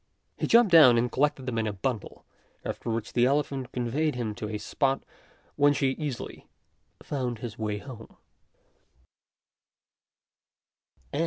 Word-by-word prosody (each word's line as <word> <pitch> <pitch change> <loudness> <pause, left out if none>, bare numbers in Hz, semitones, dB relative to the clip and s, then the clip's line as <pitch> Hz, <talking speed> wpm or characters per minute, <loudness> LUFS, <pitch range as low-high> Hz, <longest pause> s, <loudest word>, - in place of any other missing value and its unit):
He - - -2
jumped 230 -4 +5
down 145 -8 +8
and 120 +1 +1
collected 145 -1 0
them 120 -3 -2
in 110 - 0
a 105 - -2
bundle, 115 +2 -4 0.4
after - - -4
which 115 -1 -3
the 120 0 +4
elephant 135 -2 -1
conveyed 130 +5 -1
him 115 -4 -3
to 105 0 -6
a 105 - -3
spot 135 +5 -1 0.5
whence 145 0 +4
he 135 - +2
easily 135 -1 -5 0.6
found 125 -5 -3
his 115 0 -7
way 105 -1 -2
home. 115 0 -11
125 Hz, 135 wpm, -27 LUFS, 115-140 Hz, 0.6 s, down